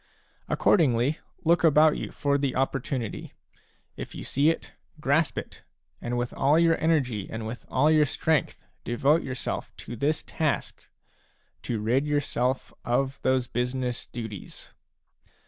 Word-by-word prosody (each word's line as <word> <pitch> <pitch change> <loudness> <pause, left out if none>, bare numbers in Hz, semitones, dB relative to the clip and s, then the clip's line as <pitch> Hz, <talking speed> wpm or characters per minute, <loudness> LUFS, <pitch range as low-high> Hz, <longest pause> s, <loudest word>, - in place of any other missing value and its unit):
Accordingly, 140 - +3 0.3
look 170 +1 +4
about 155 -1 +6
you - - -5
for 140 0 0
the 140 -2 -1
opportunity; 130 -3 -2 0.6
if - - -7
you - - -6
see 145 +4 +2
it, 165 - -3 0.3
grasp 150 +2 +2
it, - - -6 0.4
and 120 +1 -2
with 120 0 -2
all 145 +3 +3
your 165 0 +5
energy 130 -11 +1
and 110 0 -5
with 115 +2 -7
all 150 +4 +3
your 155 -1 +5
strength 155 +1 0 0.2
devote 140 +7 +2
yourself 130 -2 -4
to 120 - -7
this 145 +6 0
task, 155 -4 -2 0.4
— - - -40
to 115 -3 0
rid 125 +7 +1
yourself 130 -3 -1
of 130 +2 0
those 130 -1 +2
business 125 0 -2
duties. 110 -5 -8
135 Hz, 140 wpm, -27 LUFS, 120-150 Hz, 0.6 s, about